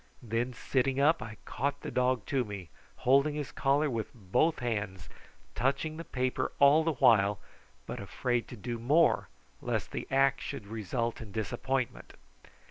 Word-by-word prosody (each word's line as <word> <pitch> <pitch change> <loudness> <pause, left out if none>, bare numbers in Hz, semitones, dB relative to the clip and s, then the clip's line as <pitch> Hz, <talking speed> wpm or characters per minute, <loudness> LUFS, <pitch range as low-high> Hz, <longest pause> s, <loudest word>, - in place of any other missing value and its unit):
Then, 115 +2 -1
sitting 130 +2 0
up, 155 +4 +4
I 110 -1 -7
caught 140 +3 -2
the - - -5
dog 125 -3 +1
to 135 -3 +1
me, 100 -6 -7 0.4
holding 140 +4 +4
his 150 -3 -4
collar 140 +2 +2
with 115 -5 -2
both 120 - +1
hands, 100 - -3 0.4
touching 140 - 0
the 165 - -5
paper 130 -4 -1
all 140 +3 +6
the 165 0 +1
while, 110 -6 +4 0.5
but - - -5
afraid 120 -2 -1
to - - -8
do 120 +2 -4
more 150 +8 +3 0.3
lest - - -2
the - - -4
act 135 0 +3
should 100 - -5
result 115 +3 -3
in 110 -3 -9
disappointment. 120 +4 -2
125 Hz, 155 wpm, -30 LUFS, 110-140 Hz, 0.5 s, all